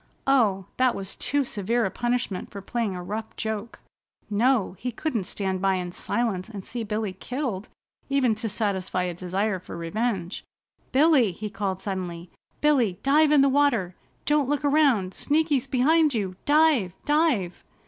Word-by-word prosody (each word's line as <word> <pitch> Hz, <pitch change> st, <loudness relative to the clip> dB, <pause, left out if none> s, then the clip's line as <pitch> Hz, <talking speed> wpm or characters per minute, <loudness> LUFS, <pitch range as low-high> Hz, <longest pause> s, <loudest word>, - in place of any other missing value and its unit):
Oh, 215 Hz, -9 st, +3 dB
that 255 Hz, -1 st, +3 dB
was 195 Hz, 0 st, -5 dB
too 285 Hz, -1 st, 0 dB
severe 230 Hz, +2 st, 0 dB
a 190 Hz, -, -1 dB
punishment 240 Hz, -6 st, -2 dB
for 200 Hz, -, -8 dB
playing 215 Hz, 0 st, -2 dB
a 180 Hz, -, -6 dB
rough 215 Hz, +4 st, -5 dB
joke! 220 Hz, 0 st, -4 dB, 0.5 s
No, 225 Hz, -2 st, +2 dB
he 250 Hz, -, -3 dB
couldn't 235 Hz, -5 st, -2 dB
stand 190 Hz, -1 st, -2 dB
by 195 Hz, 0 st, +2 dB
in 180 Hz, -1 st, -3 dB
silence 215 Hz, -1 st, -2 dB
and 200 Hz, -4 st, -8 dB
see 240 Hz, -2 st, -4 dB
Billy 210 Hz, -2 st, -2 dB
killed 230 Hz, 0 st, -4 dB, 0.4 s
even 270 Hz, -4 st, +3 dB
to 220 Hz, +1 st, -3 dB
satisfy 190 Hz, -3 st, -1 dB
a 180 Hz, -1 st, -2 dB
desire 190 Hz, +3 st, -1 dB
for 175 Hz, -, -9 dB
revenge. 185 Hz, +1 st, -2 dB, 0.5 s
"Billy!" 270 Hz, -, +4 dB
he 210 Hz, +4 st, -6 dB
called 195 Hz, -2 st, -3 dB
suddenly. 180 Hz, -3 st, -5 dB, 0.3 s
"Billy, 255 Hz, -11 st, +3 dB
dive 300 Hz, +2 st, +4 dB
in 295 Hz, -2 st, +6 dB
the 275 Hz, -, +5 dB
water! 265 Hz, -10 st, +2 dB, 0.3 s
Don't 295 Hz, -3 st, +2 dB
look 290 Hz, 0 st, 0 dB
around! 275 Hz, -11 st, +3 dB
Sneaky's 295 Hz, -3 st, +1 dB
behind 295 Hz, +3 st, +3 dB
you! 190 Hz, -4 st, -2 dB
Dive! 290 Hz, -, +3 dB
Dive!" 295 Hz, -, +1 dB
220 Hz, 160 wpm, -25 LUFS, 190-275 Hz, 0.5 s, in